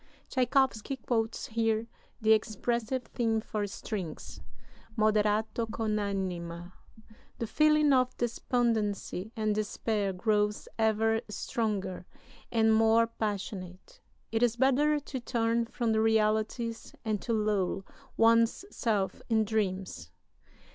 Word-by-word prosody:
[Tschaikowsky 260 -1 +1
quotes 225 -4 -2
here 225 0 0 0.3
the 220 -1 +3
expressive 235 +3 -1
theme 225 -2 0
for 215 -1 -3
strings, 190 -5 -6 0.6
Moderato 215 +1 +1
con 215 -1 -1
anima.] 180 -3 -4 0.6
The 230 - -2
feeling 305 +3 +4
of 255 -1 +2
despondency 225 -4 -1
and 215 -2 0
despair 210 -1 -1
grows 210 +2 0
ever 225 0 +2
stronger 200 -4 -3 0.4
and 220 -1 +4
more 225 +1 +5
passionate. 205 - -5 0.3
It 225 0 0
is 240 -1 +3
better 275 +4 +3
to 275 -2 -6
turn 230 -1 0
from 235 -1 -1
the 220 0 +2
realities 220 +1 0
and 215 -2 -1
to 235 - -3
lull 205 -3 0 0.3
one's 230 +8 +4
self 210 -4 -1
in 220 -1 +3
dreams. 190 - -2
220 Hz, 110 wpm, -30 LUFS, 210-235 Hz, 0.6 s, more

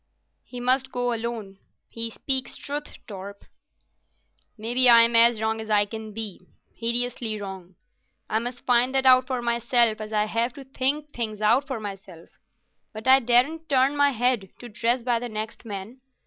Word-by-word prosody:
"He 250 - -10
must 260 +2 +1
go 245 -1 -1
alone. 225 -4 -5 0.3
He 230 0 -5
speaks 260 +2 -2
truth, 290 +1 -7
Torp." 200 0 -10 1.1
"Maybe 240 +3 +4
I'm 230 0 +7
as 230 -1 +6
wrong 220 0 -1
as 220 - -9
I 205 -1 +3
can 220 +1 -8
be—hideously 225 +2 -4
wrong. 190 -2 -9 0.5
I 220 - 0
must 245 +1 -5
find 250 +1 +3
that 265 0 +2
out 255 0 +6
for 255 -2 -3
myself, 235 -1 +1
as 215 0 -7
I 210 -1 +1
have 230 +3 -1
to 275 - -10
think 275 +3 -3
things 220 -3 -4
out 235 +7 +2
for 260 -5 -4
myself, 195 -5 -10 0.6
but 220 +3 -8
I 265 +1 +7
daren't 270 +7 +2
turn 270 +1 +2
my 285 0 +4
head 245 -5 0
to 240 - -11
dress 235 +3 -1
by 240 -1 +1
the 245 +1 -6
next 215 +2 -6
man. 210 +4 -8
235 Hz, 165 wpm, -24 LUFS, 215-255 Hz, 1.1 s, I'm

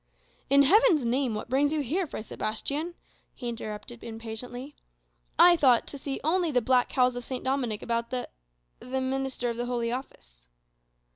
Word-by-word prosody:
"In 280 +1 +6
Heaven's 350 - +5
name, 245 -1 +1
what 210 - -5
brings 275 +4 +2
you 310 -1 0
here, 325 +7 -1
Fray 220 - -6
Sebastian?" 285 +11 -3 0.4
he 245 - -6
interrupted 230 0 -6
impatiently. 235 +4 -7 0.6
"I 350 0 +8
thought 260 -7 +4
to 280 - -6
see 270 0 -4
only 340 +3 +2
the 255 -4 +3
black 250 +1 +2
cowls 250 -2 +2
of 245 - -5
St. 255 +1 -5
Dominic 260 -5 -1
about 235 0 -1
the 255 -1 -3 0.5
the 260 +1 -3
minister 260 -2 -1
of 230 - -6
the 240 0 -2
Holy 235 -1 -1
Office." - - -8
255 Hz, 165 wpm, -28 LUFS, 235-280 Hz, 0.6 s, I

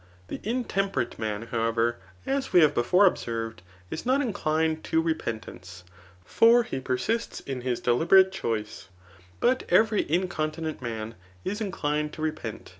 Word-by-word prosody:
The - - -5
intemperate 195 - -2
man, 110 -1 -3
however, 115 0 0 0.3
as 275 0 -1
we 180 - +6
have 150 -2 +5
before 180 +12 +4
observed, 115 - -1 0.3
is - - -4
not 260 +3 +2
inclined 160 - 0
to 160 - +1
repentance; 110 - -4 0.4
for 235 +1 +5
he 135 - -4
persists 135 - -2
in 135 -2 -5
his 125 -1 -1
deliberate 170 +10 +4
choice; 110 - -4 0.5
but 255 +1 +2
every 220 -5 +3
incontinent 160 -3 -2
man 115 -2 -5 0.3
is 210 +3 -3
inclined 150 -6 -2
to 155 - -6
repent. 155 -8 -4
155 Hz, 135 wpm, -27 LUFS, 115-195 Hz, 0.5 s, we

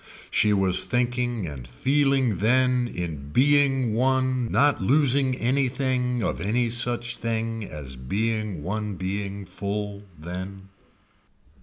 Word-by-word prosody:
She 105 - +3
was 95 -2 +4
thinking 120 -3 -1
and 70 -6 -7
feeling 135 - +1
then 125 +3 +3
in 80 -9 -5
being 135 - +3
one 130 0 +1
not 145 -4 +3
losing 135 +3 +3
anything 125 -1 0
of - - -2
any 115 +5 0
such 120 0 -1
thing 115 -1 -3
as 70 -6 -8
being 105 - -2
one 105 +2 -3
being 100 +2 -4
full 100 +2 -4 0.2
then. 95 +4 -7
115 Hz, 115 wpm, -25 LUFS, 95-130 Hz, 0.2 s, was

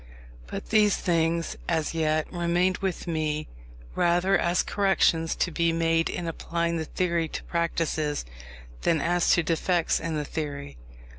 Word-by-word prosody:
But - - -6
these 210 -2 +4
things, 165 -1 0
as 160 -2 0
yet, 155 -1 +1
remained 175 +1 +1
with 190 -3 -2
me 155 -2 -2 0.5
rather 175 - +2
as 175 0 +2
corrections 190 -5 +2
to 175 - 0
be 170 +1 +1
made 165 0 +1
in 170 - -4
applying 170 +1 -2
the 160 - -3
theory 170 -1 0
to - - -6
practice, 160 - -1 0.6
than 165 - +2
as 175 +3 +3
defects 170 0 +1
in 165 -1 -3
the 150 -1 -2
theory. 145 - -5
165 Hz, 140 wpm, -26 LUFS, 160-175 Hz, 0.6 s, these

